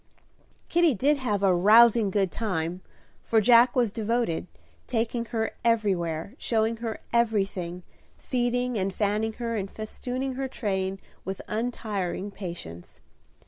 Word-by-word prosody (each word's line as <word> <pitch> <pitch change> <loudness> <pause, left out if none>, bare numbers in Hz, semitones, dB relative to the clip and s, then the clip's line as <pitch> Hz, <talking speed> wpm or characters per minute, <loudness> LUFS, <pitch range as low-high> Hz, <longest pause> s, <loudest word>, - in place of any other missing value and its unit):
Kitty 340 -5 +3
did 285 +8 +2
have 210 -7 -1
"a 190 -2 +5
rousing 220 +4 +6
good 195 -2 +1
time;" 180 -5 -2 0.4
for 225 - +2
Jack 240 +3 +6
was 240 -5 +2
devoted, 225 -5 -1 0.4
taking 235 0 -1
her 225 -1 -2
everywhere, 195 -6 0
showing 225 0 0
her 225 -1 -5
everything, 195 -6 0 0.3
feeding 245 -2 -1
and 195 +1 0
fanning 215 +2 0
her, 230 0 -3
and 195 -2 -3
festooning 250 +5 -4
her 265 +1 -3
train 195 -6 -2 0.2
with 190 0 -5
untiring 210 -4 -3
patience. 170 - -8
220 Hz, 125 wpm, -27 LUFS, 190-235 Hz, 0.4 s, rousing